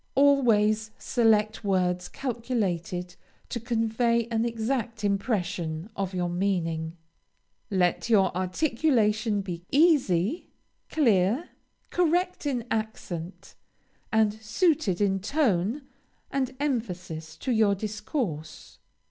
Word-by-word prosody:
Always 225 -6 +4
select 220 -3 +2
words 180 -2 0
calculated 195 -8 -2 0.3
to 240 - -3
convey 235 0 +1
an 225 0 +1
exact 230 -1 -2
impression 195 -4 -1
of 195 -1 -3
your 180 -1 0
meaning. 175 -3 -1 0.7
Let 185 +2 +1
your 195 -6 +4
articulation 215 - +1
be 175 -3 -5
easy, 280 - +3 0.4
clear, 235 - +2 0.4
correct 355 -1 +1
in 245 -5 -1
accent, 195 -5 -4 0.6
and 220 -1 +3
suited 220 - +1
in 195 -1 +2
tone 225 - 0 0.5
and 265 -1 -1
emphasis 185 - -3
to 260 - -2
your 215 -3 +3
discourse. 205 - -4
215 Hz, 95 wpm, -27 LUFS, 185-245 Hz, 0.7 s, Always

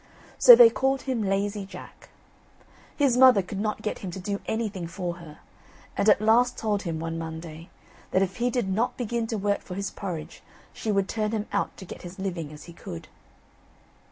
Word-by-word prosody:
So - - +11
they 470 -1 +8
called 270 0 0
him 255 -4 -1
Lazy 200 +1 -1
Jack. 190 -2 -12 0.9
His 275 -4 +3
mother 250 -6 +7
could 195 +2 -6
not 215 0 -2
get 210 - -3
him 190 - -6
to 180 - -6
do 200 +2 -3
anything 210 -6 -2
for 175 0 -4
her, 160 -3 -13 0.5
and 200 +2 +2
at 210 - +6
last 235 +3 +3
told 210 -2 -1
him, 165 -4 -4
one 165 0 -4
Monday, 160 +1 -8 0.4
that 185 - +2
if 190 0 -4
he 245 +1 +1
did 245 -4 -1
not 230 +7 0
begin 235 -1 -2
to 225 - -2
work 205 0 0
for 180 - -8
his 200 +1 -3
porridge 175 -6 -6 0.3
she 220 - -3
would 195 -1 +1
turn 215 0 -2
him 215 -1 -1
out 205 - -1
to 190 - -9
get - - -9
his 175 +1 -10
living 175 -6 -4
as 150 -1 -11
he 170 - -12
could. 85 - -9
200 Hz, 200 wpm, -26 LUFS, 180-225 Hz, 0.9 s, So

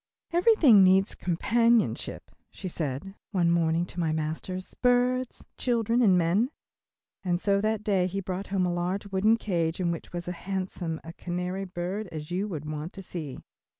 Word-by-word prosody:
"Everything 340 - +6
needs 190 +1 +4
companionship," 230 +6 +1 0.2
she 190 - -7
said 160 +2 -4 0.2
one 175 -4 +2
morning 165 0 +2
to 175 - -8
my 165 -2 +1
master, 160 +4 -3 0.2
"birds, 250 0 +2
children 235 -1 +1
and 195 -6 +5
men," 180 +8 +2 0.7
and 175 -2 0
so 200 +1 +2
that 215 0 0
day 195 -4 +2
he 195 +2 -3
brought 190 +1 -4
home 190 -2 +1
a 175 - 0
large 180 +4 -2
wooden 210 +4 +3
cage 170 -6 -1
in 175 -2 +1
which 165 - -6
was 175 0 -5
as 180 - -2
handsome 185 -3 -4
a 165 - -9
canary 180 +2 -3
bird 185 +3 -4
as 155 0 -7
you 190 +4 -1
would 155 -7 -5
want 155 +2 -5
to 195 - -8
see. 155 -7 -6
185 Hz, 170 wpm, -28 LUFS, 170-205 Hz, 0.7 s, Everything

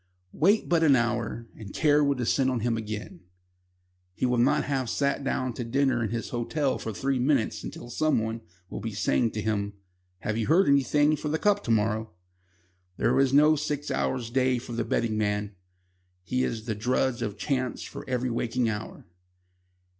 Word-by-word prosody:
Wait 200 +8 +3
but 170 -2 +2
an 150 -4 +6
hour, 120 -1 -1
and 100 -3 -10
care 150 -1 +4
will 140 -1 +2
descend 130 +2 +1
on 125 -3 -1
him 120 0 +1
again. 105 -4 -6 1.0
He - - 0
will 125 -1 +1
not 120 - +3
have 130 -3 -1
sat 140 +1 0
down 130 -2 -1
to 120 - -4
dinner 130 0 +1
in 110 - -1
his 115 +1 -3
hotel 130 +4 -1
for 110 - -4
three 135 +5 -1
minutes 130 -3 +1
till 120 - -10
someone 115 -6 0 0.3
will - - -6
be - - -5
saying 65 - +1
to 105 - -3
him: 100 -2 -1 0.5
"Have 110 +2 -2
you 110 - -1
heard 170 +3 +4
anything 145 +2 +3
for 150 0 -4
the 155 - 0
Cup 205 +3 +2
to - - -5
morrow?" 110 -1 0 0.8
There - - +2
is 135 -1 +3
no 150 +3 +6
six 150 -1 -3
hours 120 -3 -1
day 130 0 +2
for 120 0 -8
the 115 0 -1
betting 110 -1 0
man. 105 -1 -1 0.7
He 125 +8 -1
is 110 -3 -3
the 110 - -1
drudge 120 +3 0
of 105 -3 -3
chance 130 -3 -2
for - - -8
every 125 -1 -1
waking 120 0 0
hour. 105 0 -6
125 Hz, 185 wpm, -27 LUFS, 110-140 Hz, 1.0 s, an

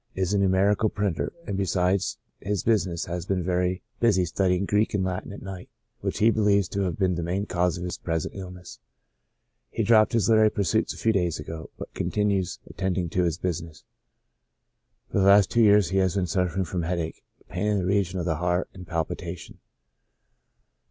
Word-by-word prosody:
Is 95 +1 0
a 100 - +2
numerical 100 +3 +3
printer, 100 -5 -2
and 100 - -3
besides 95 0 0 0.2
his 100 -1 -2
business 95 -7 +1
has 85 +1 -5
been 95 -2 0
very 90 +1 0 0.2
busy 100 -6 +3
studying 90 +2 +1
Greek 105 +2 +1
and 95 - +1
Latin 95 0 -3
at 100 - -9
night, 95 -2 -8 0.3
which - - -3
he 110 +2 +5
believes 100 -3 +2
to 100 - -2
have 90 - -2
been 95 -2 +2
the 85 - -2
main 90 +4 -1
cause 90 -1 0
of 90 - -6
his 90 - -4
present 80 -2 -2
illness; 90 -2 -9 0.9
he - - -2
dropped 110 -1 +5
his 115 -5 +2
literary 110 -1 +5
pursuits 100 -4 0
a - - -8
few 110 - +2
days 90 -5 0
ago, 80 +1 -7
but - - -8
continues 100 -3 0
attending 95 -2 -2
to 90 +1 +1
his 85 -2 -1
business. 85 -4 -4 1.3
For - - +1
the 95 - +3
last 100 0 +6
two 120 - +3
vears 105 -4 +5
he 95 - +1
has 95 -1 +1
been 95 -2 +1
suffer 90 +1 -1
ing 95 - +1
from 90 +1 -3
headache, 85 -1 -3 0.2
pain 90 +4 -2
in 105 -1 +2
the 95 - -1
region 95 -1 +1
of 85 - -2
the 80 -3 0
heart, 90 +2 0
and 90 -2 -11
pal 80 -1 0
pitation. 85 +1 -7
95 Hz, 195 wpm, -26 LUFS, 90-100 Hz, 1.3 s, last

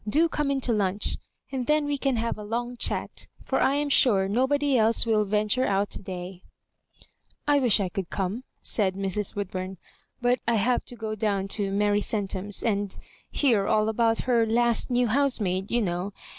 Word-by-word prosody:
Do 315 +9 +3
come 300 -3 -2
In 275 -1 0
to 245 - +1
lunch, 200 -1 -1 0.3
and 260 -3 -3
then 300 0 +2
we 290 0 -1
can 275 -2 0
have 230 0 -1
a 210 - -8
long 240 +3 -3
chat; - - -2 0.2
for - - 0
I 275 - +3
am 290 0 0
sure 205 -8 +4
nobody 265 +6 +1
else 225 0 +3
will 215 -2 +2
venture 210 +5 +1
out 200 +1 0
to 180 -1 -6 0.5
" - - -31
I 290 -1 +4
wish 245 -5 +4
I 195 - 0
could 180 0 -5
come," 200 +6 -3 0.2
said 190 -4 +1
Mrs. 195 +1 -2
"Woodbum; 190 -1 -4 0.2
" - - -43
but 245 0 +2
I 235 - +3
have 240 +4 +1
to 245 - -9
go 220 -2 -4
down 200 -2 -1
to 200 -1 0
Mary 205 +1 +2
Centum's, 200 -1 -2
and 205 -3 -1 0.3
hear 230 -9 +2
all 215 0 +2
about 225 0 +1
her 240 -3 +2
last 235 +2 +2
new 245 0 +2
housemaid, 215 -7 0
you 240 -1 +1
know. 180 +2 -3
220 Hz, 190 wpm, -26 LUFS, 200-245 Hz, 0.5 s, sure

